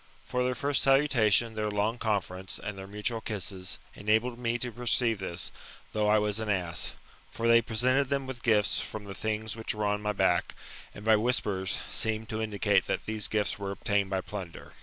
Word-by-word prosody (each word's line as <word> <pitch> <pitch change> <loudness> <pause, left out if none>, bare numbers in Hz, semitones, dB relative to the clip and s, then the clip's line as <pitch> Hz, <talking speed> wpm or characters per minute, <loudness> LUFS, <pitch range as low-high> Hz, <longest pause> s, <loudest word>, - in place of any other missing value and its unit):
For 125 0 0
their 125 0 0
first 140 +1 +1
salutation, 120 -5 +4
their 105 -1 -1
long 105 +3 0
conference, 95 -4 -1
and 105 0 -5
their 95 0 -8
mutual 105 +3 -2
kisses, 95 -4 -3 0.2
enabled 110 +4 +1
me 120 -1 0
to 125 0 -3
perceive 120 -2 +1
this, 90 -2 -1 0.4
though 105 -1 +1
I 105 +1 +5
was 105 0 +1
an 110 -1 -3
ass. 90 -4 -1 0.4
For 115 - -2
they 115 0 +7
presented 130 +4 +2
them 140 -1 0
with 130 -3 -7
gifts 105 -3 +3
from 110 - -5
the 100 - -7
things 110 +2 -3
which 110 -1 -3
were 105 0 -1
on 105 0 0
my 105 0 -1
back; 95 -3 +1 0.4
and 105 - -9
by 110 -1 +6
whispers, 105 -4 0
seemed 110 0 0
to 110 0 -2
indicate 105 -3 +1
that - - -2
these 110 -1 -1
gifts 105 -1 -1
were 100 -1 -3
obtained 100 0 0
by 95 -1 0
plunder. 95 -4 -8
110 Hz, 195 wpm, -29 LUFS, 100-115 Hz, 0.4 s, they